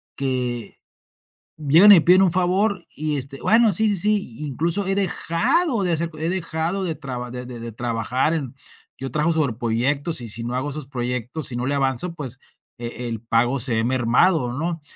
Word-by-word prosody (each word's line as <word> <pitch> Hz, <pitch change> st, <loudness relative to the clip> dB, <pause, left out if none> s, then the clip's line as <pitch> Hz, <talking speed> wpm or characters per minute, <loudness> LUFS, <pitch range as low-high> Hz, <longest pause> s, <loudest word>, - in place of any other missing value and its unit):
que 125 Hz, -3 st, -3 dB, 0.8 s
llegan 160 Hz, +8 st, +7 dB
y 180 Hz, -, +8 dB
piden 180 Hz, +4 st, +5 dB
un 190 Hz, -, +4 dB
favor 185 Hz, +1 st, +1 dB
y 150 Hz, 0 st, -2 dB
este, 135 Hz, +1 st, -7 dB
bueno, 225 Hz, -1 st, +4 dB
sí, 220 Hz, +5 st, +4 dB
sí, 205 Hz, -, +1 dB
sí, 195 Hz, -, 0 dB
incluso 170 Hz, +8 st, -1 dB
he 195 Hz, -, 0 dB
dejado 220 Hz, -, +1 dB
de 175 Hz, -, 0 dB
hacer 165 Hz, +1 st, -1 dB
co 155 Hz, -, -12 dB
he 160 Hz, +2 st, -2 dB
dejado 175 Hz, +1 st, -2 dB
de 165 Hz, -, -2 dB
traba 125 Hz, -4 st, -6 dB
de 125 Hz, 0 st, -6 dB
de 120 Hz, -2 st, -8 dB
de 115 Hz, 0 st, -6 dB
trabajar 120 Hz, +6 st, -1 dB
en 135 Hz, -5 st, -4 dB, 0.4 s
Yo 135 Hz, 0 st, -5 dB
trabajo 155 Hz, +2 st, +1 dB
sobre 150 Hz, -8 st, 0 dB
proyectos 130 Hz, +6 st, 0 dB
y 115 Hz, -, -7 dB
si 115 Hz, +2 st, -5 dB
no 120 Hz, +1 st, -4 dB
hago 130 Hz, +3 st, -2 dB
esos 150 Hz, 0 st, -5 dB
proyectos, 125 Hz, +2 st, -3 dB
si 120 Hz, -, -4 dB
no 120 Hz, -, -2 dB
le 140 Hz, -, 0 dB
avanzo, 140 Hz, +5 st, 0 dB
pues 135 Hz, -6 st, -7 dB, 0.4 s
e 120 Hz, +1 st, -5 dB
el 115 Hz, -2 st, -4 dB
pago 120 Hz, +3 st, +1 dB
se 125 Hz, -1 st, +3 dB
ve 115 Hz, -, +1 dB
mermado, 125 Hz, +3 st, +2 dB
¿no? 165 Hz, +4 st, -3 dB
145 Hz, 195 wpm, -22 LUFS, 125-170 Hz, 0.8 s, y